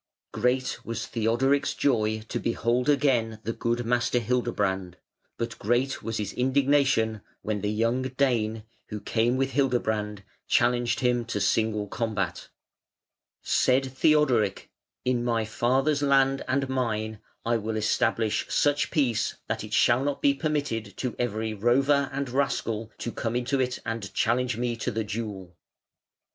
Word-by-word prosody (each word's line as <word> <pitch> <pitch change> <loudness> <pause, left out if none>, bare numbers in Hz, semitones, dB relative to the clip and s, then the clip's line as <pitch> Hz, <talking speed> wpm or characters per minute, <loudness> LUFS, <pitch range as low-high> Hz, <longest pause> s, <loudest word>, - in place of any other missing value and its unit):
Great 125 +4 0
was 115 -1 -4
Theodoric's 125 +6 +1
joy 110 -5 +1
to 120 - -3
behold 120 +3 0
again 125 -6 +2
the 115 - -2
good 120 +1 -1
Master 120 +1 +1
Hildebrand; 100 -6 -1 0.4
but 115 0 -4
great 120 +5 0
was 115 0 -3
his 105 -2 -3
indignation 130 -4 +2 0.2
when 105 -2 -2
the 105 - -1
young 115 +4 +1
Dane, 120 -5 0 0.2
who 105 - -5
came 120 +4 +1
with 135 0 0
Hildebrand, 110 -6 0 0.2
challenged 120 0 +2
him 125 -1 +2
to 110 -2 -3
single 105 +1 +1
combat. 105 -5 -3 0.9
Said 130 +1 +2
Theodoric: 130 -10 +2 0.3
"In 125 -1 +1
my 115 -2 0
father's 135 +6 +1
land 135 -1 +3
and 135 +1 0
mine 110 -5 -2 0.3
I 115 0 +2
will 110 0 -3
establish 110 0 +1
such 145 0 +2
peace 130 -8 +1
that - - -2
it - - -9
shall 120 +3 +4
not 145 0 -1
be 140 - +4
permitted 140 -8 -2
to 125 -2 -3
every 110 -2 -1
rover 135 +6 +2
and 140 0 -2
rascal 115 -4 -1
to 120 - -4
come 115 0 -3
into 125 +3 0
it 125 -1 0
and 115 -4 -4
challenge 120 0 +1
me 120 0 -1
to 115 - -2
the 110 -1 -2
duel". 100 -4 -6
120 Hz, 145 wpm, -27 LUFS, 110-130 Hz, 0.9 s, shall